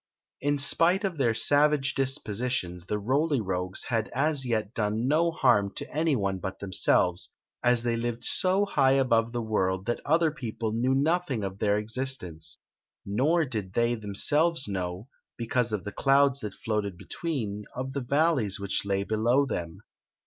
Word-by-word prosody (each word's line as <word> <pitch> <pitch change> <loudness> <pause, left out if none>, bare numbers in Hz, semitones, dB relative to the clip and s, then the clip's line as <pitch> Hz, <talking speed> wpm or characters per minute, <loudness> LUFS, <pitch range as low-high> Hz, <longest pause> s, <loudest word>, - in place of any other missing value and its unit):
In 145 +1 +1
spite 170 +7 +3
of 185 -6 -2
their 115 -4 +2
savage 145 +1 +3
dispositions 120 - -2
the 105 - -1
Roly 140 +7 +1
Rogues 90 -2 -2
had 115 -2 -1
as 140 -1 0
yet 110 -2 -1
done 110 +2 -1
no 160 +4 +3
harm 100 - +2
to - - -5
any 155 0 +1
one 100 -4 -1
but 95 +1 -5
themselves, 90 -2 +1 0.3
as 120 -1 +3
they 120 -1 0
lived 120 0 -3
so 190 +6 +3
high 135 -8 +3
above 115 -4 +2
the 120 -1 -3
world 95 -3 -1
that 120 +1 -2
other 160 +2 +2
people 115 -6 -4
knew 125 +4 +1
nothing 150 - 0
of 95 0 -5
their 105 -1 +2
existence. 105 -7 -3 0.5
Nor 145 +12 +2
did 105 -8 -5
they 120 +2 +2
themselves 135 +9 +1
know, 90 +2 -4 0.3
because 120 0 -1
of 105 -3 -2
the 105 - -5
clouds 140 +3 +3
that 105 -6 -6
floated 105 -4 -3
between, 110 - -4
of 130 +1 -4
the 140 - -2
valleys 135 - +1
which 100 -1 -1
lay 100 -1 -1
below 115 +7 +2
them. 85 -10 -5
120 Hz, 165 wpm, -27 LUFS, 100-140 Hz, 0.5 s, spite